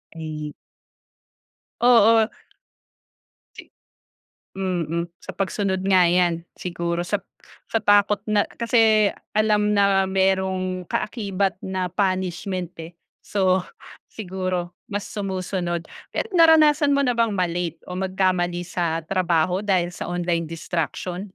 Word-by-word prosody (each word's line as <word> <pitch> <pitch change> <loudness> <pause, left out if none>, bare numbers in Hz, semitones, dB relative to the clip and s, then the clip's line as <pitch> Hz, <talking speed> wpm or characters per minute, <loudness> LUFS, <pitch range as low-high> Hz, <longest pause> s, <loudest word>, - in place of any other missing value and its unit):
Ay. 155 -2 -6 1.3
Oo. 230 -2 +5 1.3
Si - - -12 0.9
Mm. 170 -3 -1 0.2
Sa - - -9
pagsunod 190 -1 -1
nga 185 -3 +5
yan. 175 -1 +2 0.2
Siguro 170 -1 -3
sa - - -1 0.5
sa - - -1
takot 205 -1 +4
na 210 -1 +2 0.2
kasi 220 -3 +3 0.2
alam 210 -1 +2
na 195 -1 +3
merong 190 -1 0
kaakibat 195 -4 -2
na 185 -2 -3
punishment, 185 -2 -2
eh. 165 +1 -10 0.2
So, 190 -2 +1 0.5
siguro 185 -3 -4 0.2
mas 205 -1 -3
sumusunod. 185 -3 -3 0.2
Pero 450 - -4
naranasan 310 -4 +5
mo 280 - +2
na 250 - +2
bang 230 -3 +1
ma-late 175 -2 -1
o 180 - -9
magkamali 185 -2 0
sa 165 -2 -2
trabaho 175 +1 +1
dahil 185 -4 0
sa - - -6
online 175 -2 -1
distraction? 170 +2 -3
185 Hz, 110 wpm, -23 LUFS, 175-205 Hz, 1.3 s, Oo